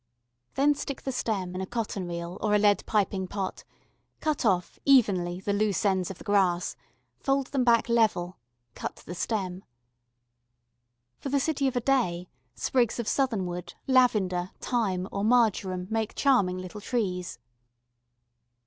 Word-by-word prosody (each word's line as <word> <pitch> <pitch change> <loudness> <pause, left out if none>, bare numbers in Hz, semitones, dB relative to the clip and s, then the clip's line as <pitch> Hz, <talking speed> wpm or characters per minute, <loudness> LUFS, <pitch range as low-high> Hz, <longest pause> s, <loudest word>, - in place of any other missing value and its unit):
Then 285 +2 +4
stick 280 -1 -6
the 265 - -2
stem 200 -7 -2
in 185 - -3
a 190 - -4
cotton 215 -5 -3
reel 170 +1 -5
or 210 -1 +2
a - - +6
lead 205 -1 +3
piping 195 -3 0
pot, 190 0 -4 0.6
cut 305 -6 0
off, 180 -3 0
evenly, 190 -10 +3
the 200 +1 -1
loose 205 -1 +1
ends 190 -3 +1
of 195 - -7
the - - -12
grass, 190 -4 +1 0.4
fold 275 -1 0
them 270 -3 +1
back 235 -2 +4
level, 215 -7 +1 0.3
cut - - -5
the 175 - -6
stem. 185 -1 -3 1.6
For - - -5
the 280 +1 +2
city 280 -2 0
of 260 - -2
a 245 - +1
day 200 -10 +1 0.3
sprigs 235 - +1
of 235 - -3
southernwood, 190 -10 -1
lavender, 205 -9 +3
thyme, 195 -7 -1
or 200 - -2
marjoram 210 -6 +2
make 225 -1 -1
charming 205 -10 +3
little 185 +3 -7
trees. 185 - -2
205 Hz, 150 wpm, -27 LUFS, 185-245 Hz, 1.6 s, a